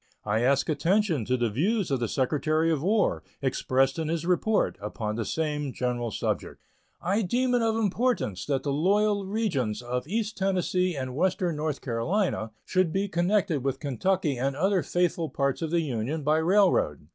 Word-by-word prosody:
I 105 +2 +1
ask 135 +3 +2
attention 165 - +1
to 130 +2 +1
the 120 -3 0
views 190 - 0
of 135 - +1
the 120 - -1
Secretary 155 +6 +1
of 155 -4 0
War, 205 +5 +1 0.2
expressed 135 +1 +1
in 160 - -2
his 165 0 -2
report, 185 +4 +1
upon 105 +1 -4
the 115 - -2
same 150 -1 -2
general 125 -2 -2
subject. - - -3 0.4
I 195 +5 +1
deem 250 +6 +1
it 245 - +3
of 225 -1 +1
importance 220 - 0
that 140 -2 0
the 140 - -1
loyal 200 +5 +2
regions 175 - -1
of 125 +3 -3
east 215 +2 -2
Tennessee 185 -2 +1
and 130 -2 -4
western 180 0 0
North 150 -1 -2
Carolina 125 - -1 0.2
should 185 -3 +1
be 195 +3 0
connected 175 -4 +1
with 135 -1 -1
Kentucky 145 0 0
and 135 +1 0
other 190 +4 +2
faithful 175 -2 0
parts 140 +2 -1
of 165 - -2
the 170 +1 +2
Union 140 +2 -3
by 150 +2 +3
railroad. 165 - +2
160 Hz, 175 wpm, -27 LUFS, 130-190 Hz, 0.4 s, it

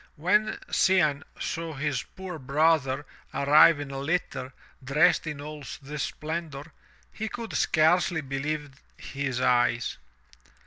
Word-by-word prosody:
When 210 +7 +1
Cianne 155 -7 +3 0.2
saw 165 -1 -4
his 140 -2 -1
poor 185 -3 -8
brother 145 0 +2 0.3
arrive 150 +2 +6
in 145 -1 -6
a 135 - -4
litter, 140 -3 -2 0.3
dressed 150 +6 +3
in 150 -2 -4
all 150 0 -8 0.2
this 145 +1 -6
splendor, 155 -1 -5 0.4
he 220 0 -4
could 230 -1 -6
scarcely 160 +1 +3
believe 145 +1 -3 0.3
his 135 -3 -4
eyes. 120 -1 +1
150 Hz, 120 wpm, -27 LUFS, 140-165 Hz, 0.4 s, arrive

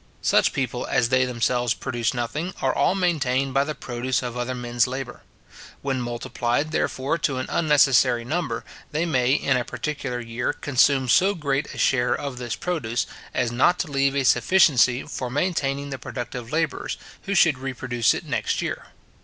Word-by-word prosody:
Such - - +3
people, 125 -2 -2
as 115 - +2
they 130 0 +3
themselves 120 0 0
produce 120 -3 -2
nothing, 150 +9 -3
are - - +1
all - - +2
maintained 135 -8 0
by 135 +1 +3
the 155 +1 -4
produce 125 -1 -2
of 120 -1 -4
other 125 +1 -2
men's 120 -1 0
labour. 130 -1 -6 0.6
When 135 -2 -1
multiplied, 120 +4 -2
therefore, 145 +1 -1
to 135 -3 0
an 130 - -2
unnecessary 135 -6 +4
number, 125 -6 -2 0.3
they 155 +3 0
may 130 -5 +2
in 135 -3 +2
a 125 - -1
particular 135 -1 -4
year 120 +1 -2
consume 135 -1 +2
so 190 +10 +4
great 145 -3 -2
a - - -10
share 125 -2 +2
of 140 -3 -5
this 120 -2 -3
produce, 120 -10 -2 0.3
as 125 -2 0
not 135 +9 +3
to 165 -5 -3
leave 135 0 +1
a 140 -1 +1
sufficiency 130 -6 +4
for 125 - -5
maintaining 140 -1 -1
the 135 - -5
productive 120 -1 -6
labourers, 160 -1 -1 0.3
who 200 - -1
should 160 -7 +4
reproduce 125 -3 0
it - - -6
next - - -1
year. - - -4
130 Hz, 170 wpm, -24 LUFS, 120-145 Hz, 0.6 s, unnecessary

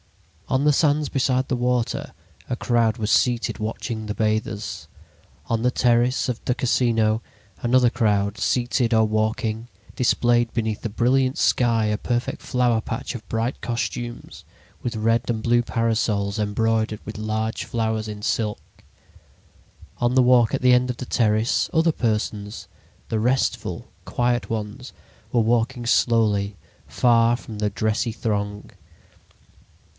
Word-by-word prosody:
On 135 +2 +1
the 150 - +5
sands 150 0 +2
beside 130 -1 +1
the 130 - 0
water 125 -1 -1 0.4
a 125 - -2
crowd 115 -2 +1
was 110 -2 -1
seated 120 -2 +1
watching 110 0 -4
the 105 - -3
bathers. 105 -6 -2 0.6
On 115 -1 -1
the 125 +1 +2
terrace 125 +2 +2
of, 125 -3 -3
the 125 - 0
Casino 115 -3 +1 0.4
another 125 0 +3
crowd, 105 -4 0
seated 120 +3 +1
or 110 0 +4
walking, 110 +1 -1 0.3
displayed 120 -1 +2
beneath 110 -2 -2
the 115 - -3
brilliant 130 +4 +1
sky 115 -3 +2
a 105 0 0
perfect 120 0 -2
flower 120 -3 +1
patch 115 +3 -5
of 115 - -8
bright 115 +3 -2
costumes, 120 0 -4 0.4
with 120 -2 -3
red 115 +2 +1
and 110 -2 -1
blue 120 0 +3
parasols 110 -3 0
embroidered 110 +1 0
with 105 - -7
large 110 +1 -2
flowers 110 -2 -2
in 105 -1 -7
silk. 110 -2 -3 1.2
On 120 +1 +1
the 130 - +6
walk 125 -2 +4
at - - -1
the 125 0 +6
end 125 +1 +3
of 125 - -3
the 125 - -6
terrace, 110 -1 +1
other 165 0 +3
persons, 105 -3 -2 0.4
the 110 - -1
restful, 125 +4 -1 0.2
quiet 120 0 -1
ones, 110 +3 -5 0.4
were 120 - +2
walking 120 +2 0
slowly, 105 -4 +2 0.3
far 120 -1 +3
from 110 -4 -9
the 105 0 +1
dressy 110 +3 -1
throng. 105 -2 -3
115 Hz, 140 wpm, -23 LUFS, 110-125 Hz, 1.2 s, the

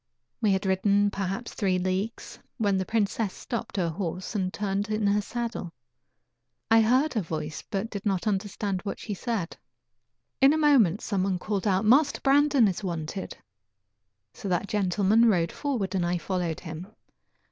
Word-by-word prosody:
We 215 -3 +3
had 190 +1 -1
ridden 200 +2 +2
perhaps 195 +5 -4
three 190 -3 +1
leagues, 185 +5 -3 0.2
when 205 -5 +1
the 190 - -3
princess 215 -2 0
stopped 235 -4 -5
her 175 -3 +1
horse 180 +3 -4
and 190 -3 -1
turned 200 +1 -2
in 215 0 0
her 205 +1 +3
saddle. 230 -6 -4 1.0
I 225 0 +7
heard 255 +7 +3
her 220 - 0
voice, 155 -3 -5
but 205 +3 -3
did 200 -2 -5
not 195 -4 0
understand 200 -1 -1
what 200 - -4
she 210 - -5
said. 200 -4 -3 0.8
In 270 +2 +7
a - - +1
moment 250 - +4
some 200 -3 -1
one 190 -1 0
called 205 +2 -2
out: 195 +1 +2
"Master 275 +7 +4
Brandon 280 -3 +4
is 190 +1 -3
wanted." 170 +1 -4 1.0
So 200 - -6
that 180 +2 0
gentleman 205 +3 +3
rode 170 -5 +1
forward, 235 -10 -2
and 185 -2 0
I 175 +1 0
followed 175 -2 -2
him. 165 +1 -7
200 Hz, 165 wpm, -27 LUFS, 185-225 Hz, 1.0 s, I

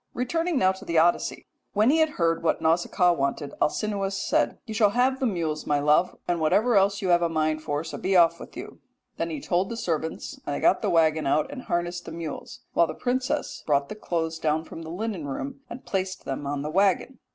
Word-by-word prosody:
Returning 330 +6 0
now 185 -6 +4
to 190 - -9
the 170 - -1
Odyssey, 170 +2 +2 0.3
when 215 +5 +4
he 320 - +3
had 315 -1 +1
heard 165 -1 +1
what 165 - +1
Nausicaa 175 +2 +2
wanted 140 -1 -2
Alcinous 195 +2 0
said: - - +1
"'You 220 - -6
shall 215 -2 +4
have 255 +4 +1
the 265 - +1
mules, 165 -7 -2
my 145 -1 +2
love, 150 +5 +2
and 175 -1 0
whatever 210 +9 +3
else 200 0 +3
you 185 - 0
have 175 0 +5
a 170 - +1
mind 155 -1 0
for, 145 0 -2
so - - -7
be 190 0 0
off 170 -1 +5
with - - -11
you.' - - -8 0.4
"Then - - -2
he 310 -3 -4
told 185 -6 0
the 230 - -5
servants, 160 -5 -3
and 145 - -3
they - - -3
got - - +3
the - - 0
waggon 160 -3 +3
out 155 - +1
and 275 -3 -6
harnessed 175 -4 -2
the - - -7
mules, 165 -3 -7
while 170 - +4
the 155 - -6
princess 255 +2 -2
brought 140 -2 +2
the - - -5
clothes 165 -5 -3
down 155 0 0
from 165 - -9
the 160 - -8
linen 185 -3 -4
room 270 - -5
and 250 - -9
placed 190 -1 -3
them 140 +1 -4
on 140 0 -2
the 150 - -3
waggon. 200 +7 +1
175 Hz, 230 wpm, -26 LUFS, 160-215 Hz, 0.4 s, have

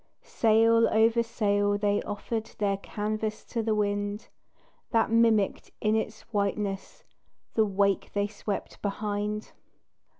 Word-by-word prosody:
Sail 230 +1 +4
over 225 +2 +4
sail 205 -3 +1
they 205 0 +1
offered 220 +2 -4
Their 200 -2 +1
canvas 215 +1 -3
to 230 - -2
the 220 -1 0
wind, 205 0 -1 0.6
That 225 -1 +2
mimicked 225 -3 +3
in 215 0 +2
its 220 0 -2
whiteness 200 -1 -2 0.5
The 220 - +3
wake 200 -1 +1
they 205 0 +1
swept 205 0 -5
behind. 210 +1 -3
210 Hz, 120 wpm, -28 LUFS, 205-220 Hz, 0.6 s, Sail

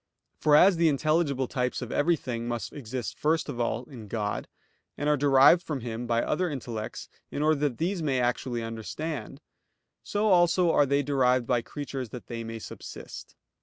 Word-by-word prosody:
For 150 -1 +4
as 180 +3 +6
the 165 -1 +4
intelligible 145 -2 +1
types 125 0 -1
of 125 -2 -6
everything 125 -7 0 0.2
exist 130 -3 -6
first 160 +2 +1
of 135 -5 -5
all 115 0 -1
in 120 -5 -11
God, 105 0 -3 0.5
and 145 - -2
are 150 - +4
derived 140 +4 +6
from 150 -6 -4
Him 120 +1 -5
by 115 0 +1
other 180 +3 0
intellects 120 -6 -5 0.2
in 145 - -2
order 155 -1 +3
that 140 -5 0
these 180 +2 -1
may 135 -5 +1
actually 120 -1 -1
understand; 115 +4 -5 0.6
so 210 +1 0
also 175 -1 +4
are 145 -2 +4
they 140 +1 +2
derived 130 -3 +2
by 120 0 +1
creatures 135 0 -6
that 125 - -9
they 115 -1 -5
may 115 0 -6
subsist. 110 - -9
135 Hz, 170 wpm, -28 LUFS, 120-155 Hz, 0.6 s, as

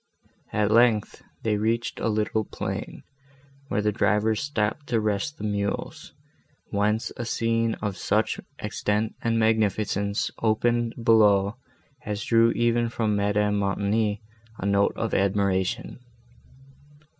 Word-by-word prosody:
At 105 0 +1
length, 115 -2 +3 0.2
they 110 -2 +1
reached 115 +3 -1
a - - 0
little 110 0 0
plain, - - -5 0.6
where 105 - -1
the 105 - +2
drivers 105 +1 +1
stopped 140 0 -2
to 115 -2 +1
rest 105 +8 -1
the - - -8
mules, 100 -1 -3 0.6
whence 105 +2 0
a 120 - -3
scene 115 0 0
of 100 -3 -2
such - - 0 0.2
extent 105 +2 -1
and 115 -1 +1
magnificence 105 -2 +1
opened 115 +1 +1
below, 105 -2 +4 0.5
as 105 0 -4
drew 115 0 +4
even 120 0 +1
from 110 -2 0
Madame 105 0 +1
Montoni 105 +2 0 0.3
a - - -5
note 100 0 +2
of 115 -2 -3
admiration. 100 +1 0
105 Hz, 120 wpm, -25 LUFS, 100-115 Hz, 0.6 s, below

